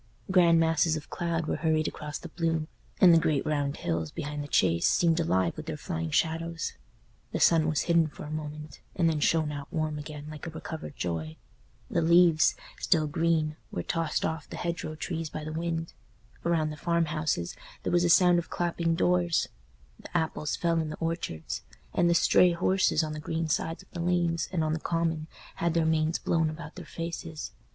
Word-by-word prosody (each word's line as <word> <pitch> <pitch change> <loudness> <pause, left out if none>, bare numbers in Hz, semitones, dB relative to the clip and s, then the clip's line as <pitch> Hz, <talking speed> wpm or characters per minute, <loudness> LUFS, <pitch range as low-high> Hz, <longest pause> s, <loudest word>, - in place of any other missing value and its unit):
Grand 170 -3 +6
masses 165 0 +3
of 155 - -7
cloud 170 -2 -1
were - - -1
hurried 155 0 +1
across 150 -1 -5
the 170 - -9
blue, 165 -1 -1 0.3
and 180 -3 +8
the 165 - +7
great 150 -4 +1
round 145 -2 -1
hills 80 -2 -2
behind 145 - -4
the - - -7
Chase 85 -11 +3
seemed 165 -1 +3
alive 95 - +1
with - - -8
their - - -3
flying 80 0 -3
shadows; 165 - -1 0.6
the - - -2
sun 160 -2 +5
was 155 - +1
hidden 170 -2 +3
for 145 - -10
a 150 - -7
moment, 150 -1 -6 0.2
and 170 -2 +3
then 160 -2 +1
shone 155 0 +2
out 145 -1 -7
warm 155 -2 -1
again 150 -1 -8
like 155 +2 -8
a - - -3
recovered 160 -2 -7
joy; 80 -2 -3 0.5
the 170 - 0
leaves, 170 -1 +5 0.2
still 160 -4 +2
green, 155 0 0
were 85 - -4
tossed 165 - -1
off 160 -1 -3
the - - -7
hedgerow 170 -2 -3
trees 165 0 -4
by 155 - -6
the 155 +1 -5
wind; 165 0 -3 0.5
around 160 -3 +1
the 150 - -7
farmhouses 155 - 0 0.3
there - - -1
was 175 0 +4
a 175 - +2
sound 175 0 +6
of 170 - -6
clapping 170 -1 0
doors; 175 -1 +2 0.5
the 175 - -3
apples 160 -2 -1
fell 170 -1 +1
in 160 -1 -2
the 155 - -6
orchards; 80 - -3 0.3
and 175 - +3
the 170 - +4
stray 175 +1 +5
horses 180 -2 +2
on 155 -1 -3
the 155 - -5
green 160 +2 -2
sides 160 +1 -1
of - - -26
the 175 - -6
lanes 170 -1 +1
and 170 -4 0
on 155 0 0
the 160 - -1
common 165 -1 -1 0.3
had 170 -1 0
their 165 -1 +3
manes 160 +1 +2
blown 165 -2 +1
about 155 0 -8
their 180 - -9
faces. 165 0 -5
160 Hz, 195 wpm, -28 LUFS, 155-170 Hz, 0.6 s, and